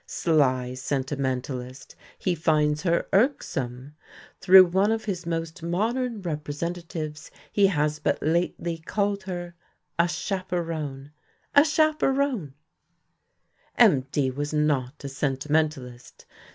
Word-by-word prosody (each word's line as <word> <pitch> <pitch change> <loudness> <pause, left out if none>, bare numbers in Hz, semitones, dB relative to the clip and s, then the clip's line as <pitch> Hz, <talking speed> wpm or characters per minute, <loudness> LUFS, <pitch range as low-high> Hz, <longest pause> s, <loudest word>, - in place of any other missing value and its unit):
Sly 130 -6 +1
sentimentalist 130 -1 -4 0.2
he 185 - 0
finds 150 -2 +1
her 170 -1 +1
irksome. 135 - 0 0.5
Through 190 0 +8
one 190 +4 +2
of 225 -1 -2
his 180 -5 -4
most 165 0 -3
modern 220 +6 -1
representatives 155 0 -5 0.2
he 200 -1 +4
has 150 -4 0
but - - 0
lately 170 +1 -1
called 200 +4 -1
her 175 -2 -5 0.5
a 170 - +5
"chaperon." 165 -6 -4 0.4
A 285 - +8
chaperon! 280 - +1 1.2
MD 130 0 +3
was 145 +1 -3
not 150 -2 0
a - - -4
sentimentalist. 135 -2 -2
160 Hz, 100 wpm, -25 LUFS, 140-185 Hz, 1.2 s, Through